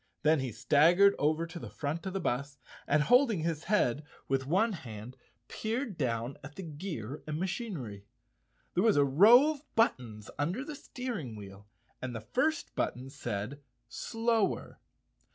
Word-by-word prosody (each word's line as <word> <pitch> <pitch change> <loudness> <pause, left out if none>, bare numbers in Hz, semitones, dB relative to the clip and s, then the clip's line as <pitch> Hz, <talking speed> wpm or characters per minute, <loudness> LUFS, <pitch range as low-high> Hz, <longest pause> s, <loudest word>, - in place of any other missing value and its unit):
Then 155 0 +4
he 130 -2 -2
staggered 170 - +5
over 155 +3 +1
to 170 +1 -8
the - - -7
front 155 +5 -4
of 190 - -4
the 195 - -1
bus 140 -3 -2 0.3
and, 150 +1 +3
holding 245 - +4
his 160 -1 -2
head 155 - +2 0.2
with 135 0 0
one 200 +8 +2
hand, 120 - -8 0.3
peered 225 0 -3
down 120 -2 -2
at 145 +2 -10
the 190 - -6
gear 150 - -6
and 155 0 -3
machinery. 170 - -4 0.7
There 180 - +2
was 220 -6 +4
a 145 - +5
row 220 - +7
of 295 -1 -11
buttons 120 - 0
under 180 - -1
the 305 - -6
steering 240 - -5
wheel 100 -1 -11 0.3
and 125 -2 -4
the - - -3
first 310 - -1
button 130 +2 -2
said 130 0 -4 0.3
"Slower." 225 - -1
155 Hz, 155 wpm, -31 LUFS, 130-205 Hz, 0.7 s, row